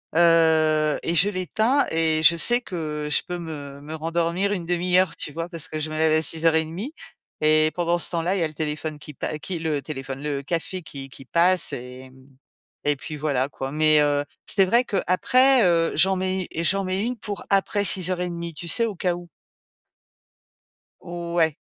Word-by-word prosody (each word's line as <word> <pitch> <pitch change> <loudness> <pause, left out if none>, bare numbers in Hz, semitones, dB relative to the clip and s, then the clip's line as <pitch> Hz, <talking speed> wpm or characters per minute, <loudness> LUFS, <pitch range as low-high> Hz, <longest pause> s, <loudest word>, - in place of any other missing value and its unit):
heu 160 -2 +4
et 165 - -1
je 175 +5 +5
l'éteins 220 +8 +1
et 160 -1 +1
je 170 +1 +6
sais 240 +8 +3
que 155 -7 -5
je - - +2
peux 175 0 -4
me 145 -4 -8
me 150 +2 -8
rendormir 170 +5 -1
1/2 180 0 0
heure, 185 -1 +2
tu 150 - -3
vois? 165 +2 -4
Parce 165 -1 -4
je 155 0 -3
me 155 - -4
lève 160 0 +3
à 155 - +3
6:30 160 - 0 0.5
et 155 0 +4
pendant 175 0 0
ce 175 - +3
temps-là, 175 +2 0
il - - -1
y - - +1
a - - +1
le 155 - -13
téléphone 155 0 -4
qui 150 0 -10
pa 155 - -4
qui 180 +3 -4
le 155 -3 -1
téléphone, 135 -2 -7
le 145 -2 -3
café 170 +4 -3
qui 135 -3 -8
qui 135 0 -12
passe 175 +6 +2
et 125 +1 -8
mmh 130 0 -21 0.5
et 145 - +3
puis, 155 +3 -8
voilà, 140 -2 -1
quoi. 135 0 -6
Mais, 155 0 +3
heu, 145 -1 +1 0.2
c'est 195 - +2
vrai 235 +7 +3
qu'après, 250 +5 +3
heu, 170 -2 +2
j'en 190 +1 +4
mets 185 0 -2
j'en 185 +4 +2
mets 190 +1 -1
une 245 +2 -2
pour 205 -1 -6
après 200 +1 +1
6:30 180 -3 -1
tu 170 +3 -7
sais, 230 +7 +2
au 220 - -3
cas 175 0 -1
où. 175 0 -10 1.7
Ouais. 170 -2 -1
165 Hz, 190 wpm, -23 LUFS, 155-185 Hz, 1.7 s, je